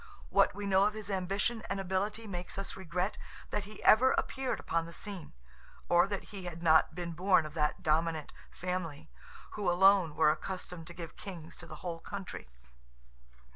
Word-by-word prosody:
What - - +4
we 205 0 -4
know 195 0 +4
of 210 +1 +1
his 210 -2 -5
ambition 195 +5 0
and 195 - -1
ability 195 +4 -1
makes 180 -3 -6
us 195 - -4
regret 185 +2 -2 0.3
that 210 -1 -1
he 215 +1 -11
ever 255 +4 +7
appeared 265 -1 -1
upon 165 0 -1
the 170 - -10
scene, 195 -4 -6 0.6
or 175 +2 +5
that 200 -1 -4
he 190 -3 -6
had 170 -1 -6
not 160 -1 +5
been 175 -1 -4
born 180 0 +3
of 155 - -7
that 150 -2 0
dominant 160 0 +1 0.2
family, 165 -4 -4 0.4
who 205 -3 -1
alone 180 -3 +5
were 150 - +5
accustomed 180 0 -5
to 175 - -9
give 165 -2 -8
kings 170 -5 -8
to 170 - -10
the 155 - -8
whole 170 -1 -3
country. 195 - -7
180 Hz, 175 wpm, -32 LUFS, 165-200 Hz, 0.6 s, ever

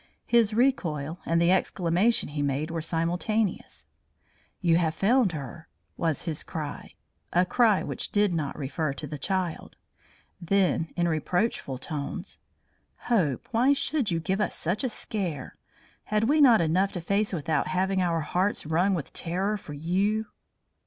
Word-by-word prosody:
His 230 -3 +3
recoil 175 - 0
and 165 +1 +2
the 170 +1 +4
exclamation 185 +3 +1
he 145 0 -3
made 145 +3 -1
were 165 -1 -2
simultaneous. 175 +6 -1 0.7
"You 170 -3 +3
have 160 -2 0
found 220 0 +3
her!" 155 +2 -7 0.3
was 160 -4 -1
his 160 -3 -2
cry, 150 -3 -6 0.4
a 180 +1 +3
cry 220 0 +3
which - - -2
did 205 -3 +2
not 155 -4 -2
refer 145 +1 -2
to 140 - -6
the 150 0 -7
child. 185 +1 -2 0.7
Then 180 -2 +1
in 175 -1 +1
reproachful 165 - -1
tones: 145 +1 -5 0.7
"Hope, 160 - +1
why 250 +4 +4
should 280 -3 0
you 170 -2 0
give 190 +5 -1
us - - 0
such 180 +9 -1
a 260 - +1
scare? 180 - -3 0.5
Had 215 0 0
we 295 +6 +3
not 240 -8 +7
enough 180 +5 +2
to 175 - -4
face 200 +5 +1
without 160 -1 -1
having 185 +1 0
our 170 -2 +1
hearts 185 +6 0
wrung 175 +5 +2
with 160 - -5
terror 190 +5 -1
for 175 -7 -8
you?" 195 +8 0
175 Hz, 150 wpm, -27 LUFS, 160-205 Hz, 0.7 s, not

